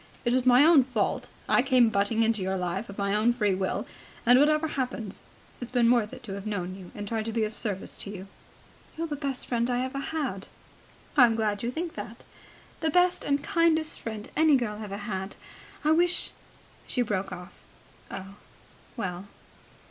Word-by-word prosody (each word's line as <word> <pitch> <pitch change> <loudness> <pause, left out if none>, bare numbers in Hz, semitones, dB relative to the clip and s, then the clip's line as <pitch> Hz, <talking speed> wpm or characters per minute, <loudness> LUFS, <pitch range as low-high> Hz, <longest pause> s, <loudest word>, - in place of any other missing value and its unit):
It 240 - +2
was 255 0 +2
my 255 +3 +7
own 325 -4 +7
fault. 245 -5 -1 0.2
I - - +4
came 255 -3 +4
butting 220 +2 +2
in 225 +1 +3
on 215 - -5
your 190 +1 -1
life 180 +5 -3
of 200 - -9
my 200 -1 0
own 215 +3 +3
free 210 -5 +1
will, 190 0 -1 0.4
and, 245 +2 +7
whatever 305 +2 +3
happens, 245 -7 -4 0.4
it's 245 - -5
been 240 -2 +4
worth 230 -4 +2
it 255 - -10
to 205 -4 -6
have 200 +2 -6
known 185 -3 -3
you 185 -2 -11
and 205 0 -5
tried 220 0 -2
to 225 - -2
be 225 0 0
of 215 0 -2
service 205 -4 -3
to - - -4
you." 195 -1 -7 0.7
"You're 330 - -1
the 305 -3 -3
best 275 -3 -3
friend 235 0 0
I've 250 +1 -1
ever 275 - -2
had." 265 -12 -3 0.7
"I'm 245 -6 +6
glad 210 -2 0
you 235 - -1
think 325 +6 -4
that." - - -8 0.6
"The 320 - +1
best 360 +3 +3
and 285 0 0
kindest 325 -2 +2
friend 220 -2 -6
any 315 -2 +5
girl 220 -4 -1
ever 200 -2 -5
had. 195 -2 -4 0.5
I 305 - +3
wish.. 350 +2 +2 0.3
." - - -27
She 250 - +1
broke 200 -3 -2
off. 180 +1 -8 0.6
"Oh, 195 +1 -8 0.6
well. 185 -2 -4
230 Hz, 195 wpm, -27 LUFS, 200-270 Hz, 0.7 s, my